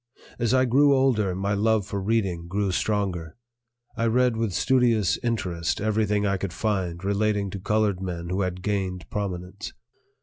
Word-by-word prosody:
As 115 -2 +1
I 130 0 +4
grew 140 +3 +4
older, 110 -8 +2
my 100 +2 -1
love 110 0 +2
for 100 0 -4
reading 95 -5 -1
grew 100 +1 -1
stronger. 90 -5 -1 0.6
I 115 -1 0
read 125 +1 +3
with 115 -2 -1
studious 115 -1 +2
interest 90 -9 -1
everything 105 -1 +1
I 100 -1 +1
could 95 -1 -4
find 95 -4 -2
relating 100 0 0
to 100 - -5
colored 105 -1 0
men 85 -2 -4
who 95 +2 -1
had 90 -1 -3
gained 95 -4 -2
prominence. 95 -1 -4
100 Hz, 160 wpm, -25 LUFS, 90-110 Hz, 0.6 s, I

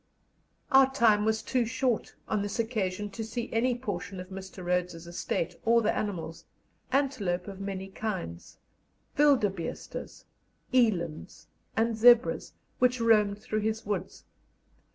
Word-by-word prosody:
Our 270 -1 +6
time 220 -6 +4
was 220 0 +1
too 250 +1 +1
short 245 0 -1
on 215 -2 0
this 205 0 -3
occasion 210 -4 -2
to 225 - -5
see 230 +2 -5
any 240 +2 +2
portion 200 -5 -5
of 185 0 -8
Mr. 190 -1 -8
Rhodes's 180 -1 -1
estate 170 -1 -3
or 230 0 +4
the 215 - +1
animals 170 -5 -4 0.5
antelope 230 -11 0
of 195 -1 -8
many 195 -1 -4
kinds, 190 - -5 0.6
wildebeestes, 215 - 0 0.5
elands, 175 - 0 0.3
and 225 0 +2
zebras 240 +2 +5 0.3
which 250 0 +3
roamed 210 -3 +4
through 215 - -1
his 220 +1 -2
woods. 195 -3 -4
210 Hz, 130 wpm, -29 LUFS, 190-235 Hz, 0.6 s, Our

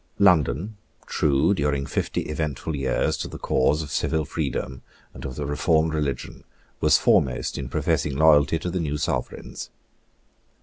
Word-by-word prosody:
London, 90 - +3 0.3
true 75 +5 +2
during 70 -5 0
fifty - - -2
eventful 75 0 -3
years 65 -2 0
to - - -4
the - - -8
cause 75 +4 +1
of 70 - -9
civil 80 +1 0
freedom 65 -4 -3 0.3
and - - -9
of 65 -2 -5
the 75 - -4
reformed 80 +2 +1
religion, 70 -5 -3 0.4
was - - +5
foremost 65 -1 +2
in 65 -2 -5
professing 70 +1 0
loyalty 75 0 +5
to 90 +2 -4
the 90 - -1
new 75 -3 -2
Sovereigns. - - -4
75 Hz, 145 wpm, -24 LUFS, 70-80 Hz, 0.4 s, was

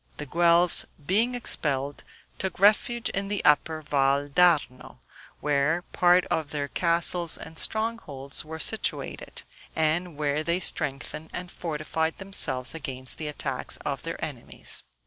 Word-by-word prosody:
The 150 - -5
Guelphs 170 +3 +4 0.2
being 225 - +2
expelled, 145 - -1 0.4
took 190 -2 -3
refuge 215 +4 +4
in 195 +1 -2
the 205 0 -2
Upper 155 +1 +3
Val 140 0 +2
d'Arno, 155 -5 +2 0.4
where 150 +4 +1
part 180 0 +5
of 155 -2 -1
their 145 -1 -2
castles 170 +1 +1
and 160 - -10
strongholds 220 -12 -2
were 160 +1 -7
situated, 220 +7 -2 0.3
and 160 +1 0
where 150 0 0
they 170 +2 +1
strengthened 150 -1 -1
and 180 0 -5
fortified 160 0 -2
themselves 140 -10 -1
against 130 -5 -6
the 155 - -3
attacks 150 - -3
of - - -2
their - - -5
enemies. - - -5
160 Hz, 130 wpm, -27 LUFS, 145-180 Hz, 0.4 s, part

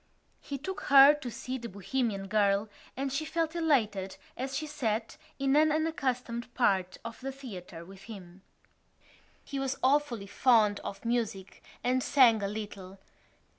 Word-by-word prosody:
He 280 - -6
took 380 +8 -6
her 275 +1 +9
to 295 -4 -6
see 255 +3 -5
The 235 0 -7
Bohemian 200 +1 -2
Girl 205 0 +2 0.3
and 270 0 -2
she 295 +3 -1
felt 325 +1 -2
elated 215 - +1 0.2
as 265 +1 -3
she 310 - -3
sat 230 -7 -2 0.2
in 275 0 +1
an 310 +1 +5
unaccustomed 255 -7 -2
part 190 -6 +1
of 230 0 -7
the 270 +1 -4
theatre 185 -11 -9
with 195 +1 -13
him. 190 -4 -11 1.0
He 275 - -4
was 270 0 -2
awfully 260 -6 +2
fond 215 -2 +3
of 195 - -8
music 225 -5 -2 0.2
and 255 +1 +2
sang 245 -6 +5
a 200 - -1
little. 200 -2 -7
240 Hz, 150 wpm, -30 LUFS, 200-275 Hz, 1.0 s, her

